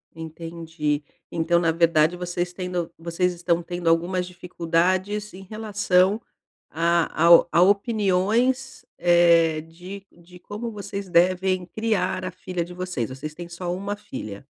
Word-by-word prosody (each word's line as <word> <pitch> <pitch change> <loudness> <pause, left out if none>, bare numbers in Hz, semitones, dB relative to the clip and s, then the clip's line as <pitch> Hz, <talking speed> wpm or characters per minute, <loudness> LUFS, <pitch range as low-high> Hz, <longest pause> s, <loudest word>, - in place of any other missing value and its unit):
Entendi. 160 -2 -4 0.3
Então 170 +1 +2
na 165 -1 +2
verdade, 165 0 +3
vocês 175 0 -3
tendo 180 -2 -4
vocês 170 +2 -1
estão 170 0 0
tendo 175 0 -5
algumas 180 +2 +1
dificuldades 180 +3 -1
em 195 +1 -10
relação 205 -1 +1 0.5
a 170 +1 +1
ao 170 0 +8
a 170 - +4
opiniões, 215 +6 +1
eh, 170 -2 +4
de 180 +5 -11
de 175 +1 -17
como 220 +5 -6
vocês 200 -1 -6
devem 185 +1 +2
criar 195 -3 -1
a 185 - -4
filha 180 -1 -4
de 180 - -11
vocês, 180 -11 -3
vocês 140 +4 -7
têm 175 +1 -8
só 175 0 -4
uma 200 +2 -3
filha. 120 - -8
180 Hz, 135 wpm, -24 LUFS, 170-190 Hz, 0.5 s, ao